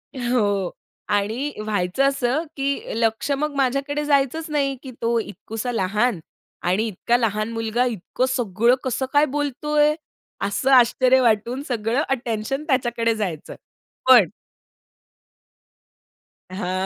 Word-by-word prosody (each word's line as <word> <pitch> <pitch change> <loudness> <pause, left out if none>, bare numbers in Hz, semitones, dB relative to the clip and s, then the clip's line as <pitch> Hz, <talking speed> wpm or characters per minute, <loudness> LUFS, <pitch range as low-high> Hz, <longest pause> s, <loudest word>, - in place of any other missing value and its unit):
हो. 210 -7 0 0.4
आणि 220 +8 0
व्हायचं 205 +4 0
असं, 275 +3 0
की 275 0 -2
लक्ष 225 +4 0
मग 285 +1 -1
माझ्याकडे 275 +2 0
जायचंच 285 +2 +1
नाही, 280 -2 0
की 260 - -8
तो 230 0 +1
इतकुसा 220 +3 -5
लहान 210 0 0 0.5
आणि 200 +6 +1
इतका 235 +4 0
लहान 215 -1 -1
मुलगा 225 +2 0
इतकं 240 +2 -2
सगळं 235 -1 +2
कसं 260 +1 -1
काय 290 +1 +5
बोलतोय? 295 +1 +1 0.5
असं 255 +7 0
आश्चर्य 255 +1 +5
वाटून, 235 +3 +1
सगळं 235 +2 0
अटेन्शन 245 +2 -2
त्याच्याकडे 240 -4 +1
जायचं. 180 -8 -4 0.5
पण 220 -10 +8 2.2
हां. 185 0 -2
240 Hz, 115 wpm, -22 LUFS, 215-275 Hz, 2.2 s, पण